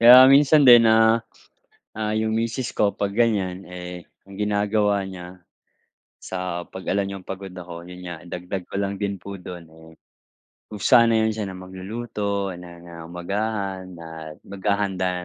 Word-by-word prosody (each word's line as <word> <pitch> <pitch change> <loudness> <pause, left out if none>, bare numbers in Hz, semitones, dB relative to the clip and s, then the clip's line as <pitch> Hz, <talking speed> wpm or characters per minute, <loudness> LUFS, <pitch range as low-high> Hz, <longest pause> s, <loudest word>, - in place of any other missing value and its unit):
Kaya 125 +2 +10
minsan 145 +1 +6
din, 120 -2 +8
ah, 110 +1 +5 0.8
ah, 110 -1 -2
yung 110 0 0
misis 115 +2 -2
ko 100 -1 +3
pag 100 -1 -2
gan'yan, 100 -5 +1
eh, 90 -1 -7 0.2
ang 100 - -11
ginagawa 105 -1 +1
niya, 90 -1 -9 0.8
sa 90 -2 -4
pag 95 - -9
alam 100 0 +1
niyang 100 -1 -7
pagod 95 -1 -7
ako, 85 -1 -9
yun 90 0 -10
nga 85 -2 -6
dagdag 90 +1 -5
ko - - -9
lang 100 0 -2
din 100 -1 -1
po 100 0 -7
dun, 90 -1 -8
eh, 80 0 -16 0.8
kusa 115 +3 +4
na 110 -1 +3
yan 110 - +1
siya 105 -1 -4
na 95 - -7
magluluto 100 +1 -4
ng, 85 -1 -11
ah, 85 -1 -9
umagahan 95 +2 -3
at 80 -2 -9
maghahanda 95 -2 -1
100 Hz, 155 wpm, -23 LUFS, 90-110 Hz, 0.8 s, Kaya